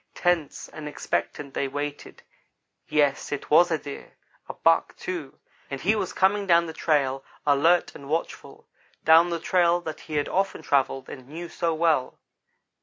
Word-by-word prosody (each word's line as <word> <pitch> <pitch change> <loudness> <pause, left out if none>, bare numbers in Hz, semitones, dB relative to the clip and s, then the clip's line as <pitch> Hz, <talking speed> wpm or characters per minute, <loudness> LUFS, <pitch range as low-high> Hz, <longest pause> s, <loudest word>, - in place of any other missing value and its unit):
Tense 175 -5 0
and 155 -1 -9
expectant 145 -1 -3
they 140 - -1
waited 145 +1 -6 0.6
yes, 145 -2 +1
it 145 - -5
was 175 +4 +6
a 160 - +1
deer 145 -2 -10 0.3
a - - -4
buck, 165 0 +2
too, 165 -7 -6 0.3
and 140 - -5
he 210 +9 +2
was 200 -4 -2
coming 200 +1 +2
down 170 -1 +5
the 160 - -6
trail, 135 -4 0 0.2
alert 155 +5 +3
and 140 0 -11
watchful 165 +2 -4 0.4
down 165 +2 +7
the 170 -1 -2
trail 175 0 +2
that 160 -2 -6
he 155 - -7
had 145 -1 0
often 195 +1 -1
travelled 135 -1 0
and 130 -1 -10
knew 170 +3 -7
so 165 -1 -1
well. 155 -5 +1
155 Hz, 165 wpm, -25 LUFS, 145-170 Hz, 0.6 s, down